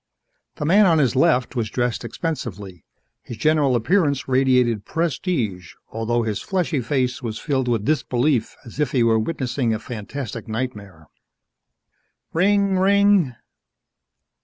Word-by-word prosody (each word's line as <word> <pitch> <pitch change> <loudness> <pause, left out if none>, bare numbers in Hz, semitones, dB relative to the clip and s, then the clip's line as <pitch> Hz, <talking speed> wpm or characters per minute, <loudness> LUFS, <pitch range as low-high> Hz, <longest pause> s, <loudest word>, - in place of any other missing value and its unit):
The 150 - -4
man 195 +6 +5
on 165 -2 +4
his 140 -3 +2
left 130 -2 +2
was 115 -3 -1
dressed 120 0 -2
expensively. 105 - -5 0.4
His 120 - -9
general 145 0 +2
appearance 140 - +1
radiated 125 -4 +2
prestige 130 - -2
although 115 +1 -1
his 110 -3 -3
fleshy 175 -7 -1
face 130 +2 -1
was 115 -3 -4
filled 135 -4 -1
with 115 -4 0
disbelief 135 -3 0
as 120 +4 -11
if 150 -4 0
he 125 -3 +3
were 115 -1 +3
witnessing 125 -3 -1
a - - -2
fantastic 120 +2 -7
nightmare. 105 -8 -5 1.3
_Rinnnng! 195 +2 +2
Rinnnng! 200 -7 +3
130 Hz, 130 wpm, -22 LUFS, 115-155 Hz, 1.3 s, man